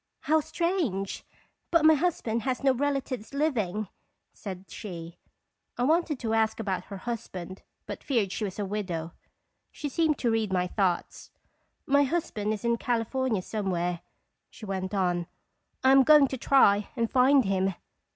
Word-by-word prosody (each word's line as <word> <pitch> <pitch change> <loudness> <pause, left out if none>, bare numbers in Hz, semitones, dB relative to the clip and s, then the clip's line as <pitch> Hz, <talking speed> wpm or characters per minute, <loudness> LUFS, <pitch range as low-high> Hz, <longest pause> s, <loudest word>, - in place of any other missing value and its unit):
" - - -54
How 315 - +6
strange! 315 - -2 0.5
but 335 -2 +3
my 315 - +8
husband 300 -8 0
has 260 +2 -2
no 270 -1 +4
relatives 275 -3 -2
living," 215 - 0 0.5
said 190 -2 -8
she. 170 -5 -8 0.6
I 245 - 0
wanted 315 +1 +2
to 225 -1 -1
ask 220 0 +1
about 190 -4 -2
her 200 - -8
husband, 190 -4 -6 0.2
but - - -7
feared 225 -9 0
she 215 - -3
was 195 -2 -4
a 205 - -2
widow. 180 -5 -4 0.6
She 295 - -5
seemed 310 +1 +1
to 235 - 0
read 220 -3 0
my 180 -1 +1
thoughts. 180 -2 -1 0.3
" - - -47
My 285 +1 +4
husband 260 -9 -1
is 215 +2 -4
in 235 0 +2
California 240 -3 -1
somewhere," 180 -5 -2 0.5
she 220 - -11
went 190 0 -3
on. 175 -3 0 0.6
"I 260 - +6
am 270 0 +8
going 295 0 +7
to - - -3
try 210 -6 +4
and 230 -2 0
find 260 0 +5
him." 190 -1 0
225 Hz, 160 wpm, -28 LUFS, 190-275 Hz, 0.6 s, my